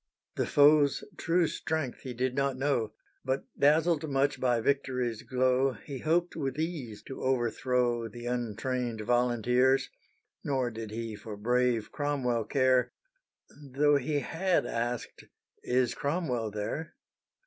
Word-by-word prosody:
The -, -, 0 dB
foe's 145 Hz, -1 st, +5 dB
true 170 Hz, +1 st, +2 dB
strength 155 Hz, -4 st, -3 dB
he 125 Hz, -2 st, -7 dB
did 125 Hz, +1 st, 0 dB
not 140 Hz, -1 st, 0 dB
know, 130 Hz, -6 st, 0 dB, 0.3 s
But 130 Hz, +1 st, -1 dB
dazzled 155 Hz, +1 st, +3 dB
much 140 Hz, +1 st, +1 dB
by 125 Hz, -2 st, +2 dB
victory's 125 Hz, -3 st, 0 dB
glow 130 Hz, +1 st, +2 dB
He 135 Hz, +1 st, -8 dB
hoped 170 Hz, +4 st, +1 dB
with 135 Hz, -4 st, -3 dB
ease 155 Hz, -10 st, -4 dB
to 135 Hz, -, -8 dB
overthrow 120 Hz, -1 st, 0 dB
The 120 Hz, +2 st, -9 dB
untrained 120 Hz, 0 st, -2 dB
volunteers; 125 Hz, +3 st, +2 dB, 0.5 s
Nor 130 Hz, -4 st, 0 dB
did 110 Hz, -1 st, -6 dB
he 115 Hz, 0 st, -5 dB
for 105 Hz, 0 st, -8 dB
brave 120 Hz, 0 st, +1 dB
Cromwell 130 Hz, -6 st, -1 dB
care, 130 Hz, -2 st, +2 dB, 0.7 s
Tho' 145 Hz, +1 st, +2 dB
he 145 Hz, +2 st, -1 dB
had 180 Hz, +4 st, 0 dB
asked 120 Hz, +1 st, -3 dB, 0.4 s
"is 125 Hz, 0 st, +1 dB
Cromwell 140 Hz, -7 st, -1 dB
there?" 110 Hz, -, -4 dB
130 Hz, 125 wpm, -30 LUFS, 120-145 Hz, 0.7 s, foe's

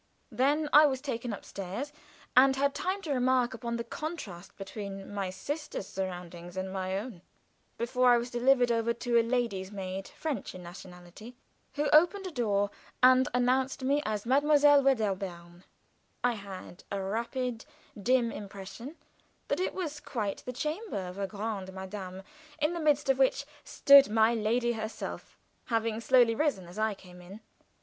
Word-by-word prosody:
Then 290 Hz, +4 st, +2 dB
I 300 Hz, 0 st, +9 dB
was 265 Hz, -2 st, -1 dB
taken 245 Hz, -4 st, -4 dB
upstairs, 200 Hz, +7 st, -6 dB, 0.4 s
and 265 Hz, +1 st, +7 dB
had 280 Hz, +1 st, +1 dB
time 380 Hz, +5 st, -2 dB
to 300 Hz, -, -1 dB
remark 255 Hz, -1 st, +2 dB
upon 235 Hz, -1 st, -4 dB
the 235 Hz, -, -3 dB
contrast 230 Hz, -, -7 dB
between 195 Hz, 0 st, -7 dB
my 195 Hz, -2 st, -2 dB
sister's 290 Hz, -, -5 dB
surroundings 175 Hz, -1 st, -6 dB
and 190 Hz, 0 st, -3 dB
my 190 Hz, 0 st, -2 dB
own, 205 Hz, -4 st, -7 dB, 0.6 s
before 250 Hz, +2 st, +2 dB
I 240 Hz, -, +7 dB
was 240 Hz, +1 st, -3 dB
delivered 245 Hz, 0 st, +3 dB
over 230 Hz, 0 st, +1 dB
to 235 Hz, 0 st, +1 dB
a -, -, +5 dB
lady's 230 Hz, -5 st, -1 dB
maid 195 Hz, -1 st, -5 dB
French 310 Hz, -10 st, -5 dB
in 180 Hz, -, -9 dB
nationality 180 Hz, +5 st, -11 dB, 0.4 s
who 295 Hz, 0 st, 0 dB
opened 350 Hz, +6 st, +5 dB
a 370 Hz, -, -4 dB
door 205 Hz, -7 st, 0 dB, 0.3 s
and 255 Hz, 0 st, +6 dB
announced 255 Hz, +2 st, +1 dB
me 280 Hz, +3 st, +2 dB
as 215 Hz, -1 st, -3 dB
Mlle. 260 Hz, +4 st, +4 dB, 0.2 s
Veddairebairne. 200 Hz, -12 st, +2 dB, 0.6 s
I 245 Hz, -, +4 dB
had 195 Hz, -4 st, -9 dB
a 200 Hz, -, -1 dB
rapid, 230 Hz, +4 st, -3 dB, 0.4 s
dim 240 Hz, +1 st, +2 dB
impression 205 Hz, -, -8 dB, 0.5 s
that -, -, 0 dB
it 370 Hz, -, -1 dB
was 310 Hz, -6 st, -4 dB
quite 210 Hz, -6 st, -3 dB
the -, -, -2 dB
chamber 305 Hz, -, -3 dB
of 180 Hz, +2 st, -8 dB
a 195 Hz, -, -1 dB
grande 205 Hz, -2 st, -4 dB, 0.2 s
dame, 190 Hz, -2 st, -7 dB, 0.4 s
in 305 Hz, +3 st, +1 dB
the 340 Hz, -, -3 dB
midst 295 Hz, -2 st, +2 dB
of 270 Hz, 0 st, +3 dB
which 270 Hz, +1 st, +2 dB, 0.2 s
stood 280 Hz, -2 st, +7 dB
my 220 Hz, +1 st, +4 dB
lady 235 Hz, +2 st, +1 dB
herself, 220 Hz, -1 st, -6 dB, 0.3 s
having 225 Hz, -2 st, 0 dB
slowly 240 Hz, -1 st, +5 dB
risen 240 Hz, -, 0 dB
as 180 Hz, +4 st, -9 dB
I 215 Hz, -1 st, +1 dB
came 180 Hz, -2 st, -14 dB
in. 195 Hz, +5 st, -11 dB
235 Hz, 160 wpm, -30 LUFS, 195-265 Hz, 0.6 s, I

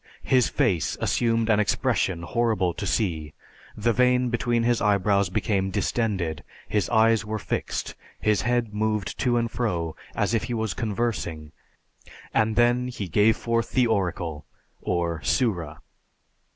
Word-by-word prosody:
His 130 Hz, -2 st, +3 dB
face 90 Hz, -9 st, 0 dB
assumed 115 Hz, -1 st, +1 dB
an 105 Hz, -2 st, +3 dB
expression 95 Hz, -4 st, 0 dB
horrible 110 Hz, -4 st, 0 dB
to 100 Hz, -, -4 dB
see, 80 Hz, -7 st, -1 dB, 0.4 s
the 115 Hz, +2 st, +1 dB
vein 125 Hz, +1 st, +3 dB
between 120 Hz, 0 st, 0 dB
his 120 Hz, 0 st, +2 dB
eyebrows 100 Hz, -1 st, +2 dB
became 95 Hz, 0 st, 0 dB
distended, 95 Hz, -7 st, -1 dB, 0.2 s
his 105 Hz, -2 st, 0 dB
eyes 115 Hz, -2 st, +4 dB
were 110 Hz, +1 st, -3 dB
fixed, -, -, -3 dB, 0.3 s
his 105 Hz, -3 st, +2 dB
head 120 Hz, -1 st, 0 dB
moved 105 Hz, -1 st, -1 dB
to 120 Hz, -2 st, +2 dB
and 115 Hz, -1 st, -1 dB
fro, 85 Hz, -9 st, -2 dB, 0.2 s
as -, -, 0 dB
if 115 Hz, -, +1 dB
he 120 Hz, -, -3 dB
was 110 Hz, -4 st, -1 dB
conversing, 100 Hz, -9 st, -3 dB, 0.8 s
and 110 Hz, -1 st, +2 dB
then 120 Hz, +1 st, +3 dB
he 115 Hz, -6 st, -5 dB
gave 105 Hz, +6 st, +3 dB
forth 115 Hz, 0 st, -1 dB
the 130 Hz, -1 st, +4 dB
oracle 85 Hz, -8 st, -1 dB, 0.4 s
or 85 Hz, -2 st, -1 dB
Sura. 85 Hz, -, -1 dB
110 Hz, 140 wpm, -25 LUFS, 90-115 Hz, 0.8 s, eyes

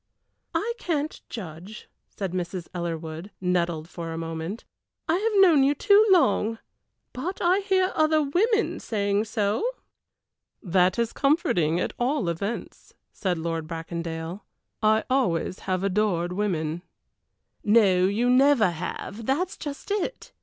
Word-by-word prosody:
"I 470 Hz, +3 st, 0 dB
can't 310 Hz, -6 st, -2 dB
judge," 185 Hz, 0 st, -8 dB, 0.2 s
said 195 Hz, -3 st, -5 dB
Mrs. 180 Hz, -1 st, -4 dB
Ellerwood, 165 Hz, 0 st, -4 dB
nettled 175 Hz, -3 st, 0 dB
for 170 Hz, -1 st, -6 dB
a 165 Hz, -, -4 dB
moment. 165 Hz, +6 st, -5 dB, 0.4 s
"I 325 Hz, -, +2 dB
have 420 Hz, 0 st, +2 dB
known 320 Hz, -7 st, +6 dB
you 280 Hz, +2 st, +3 dB
too 410 Hz, +7 st, +5 dB
long, 225 Hz, -, +3 dB, 0.6 s
but 340 Hz, +10 st, -4 dB
I 365 Hz, +2 st, +3 dB
hear 380 Hz, -2 st, +1 dB
other 310 Hz, 0 st, +3 dB
women 425 Hz, +10 st, +1 dB
saying 205 Hz, -1 st, 0 dB
so." 210 Hz, -, 0 dB, 1.0 s
"That 185 Hz, 0 st, +2 dB
is 235 Hz, -1 st, 0 dB
comforting, 180 Hz, -, +2 dB
at -, -, -2 dB
all 245 Hz, -, +1 dB
events," 200 Hz, +7 st, -5 dB, 0.2 s
said 185 Hz, -4 st, -2 dB
Lord 165 Hz, -1 st, -3 dB
Bracondale. 165 Hz, +2 st, -5 dB, 0.4 s
"I 220 Hz, 0 st, +3 dB
always 190 Hz, -9 st, 0 dB
have 185 Hz, 0 st, 0 dB
adored 185 Hz, -3 st, 0 dB
women." 175 Hz, -5 st, -1 dB, 0.8 s
"No, 200 Hz, -4 st, +4 dB
you 220 Hz, +5 st, +1 dB
never 250 Hz, -5 st, +5 dB
have, 195 Hz, +6 st, -6 dB
that 325 Hz, +8 st, +1 dB
is -, -, -9 dB
just 290 Hz, +6 st, -7 dB
it. 415 Hz, +4 st, -3 dB
205 Hz, 130 wpm, -26 LUFS, 170-285 Hz, 1.0 s, known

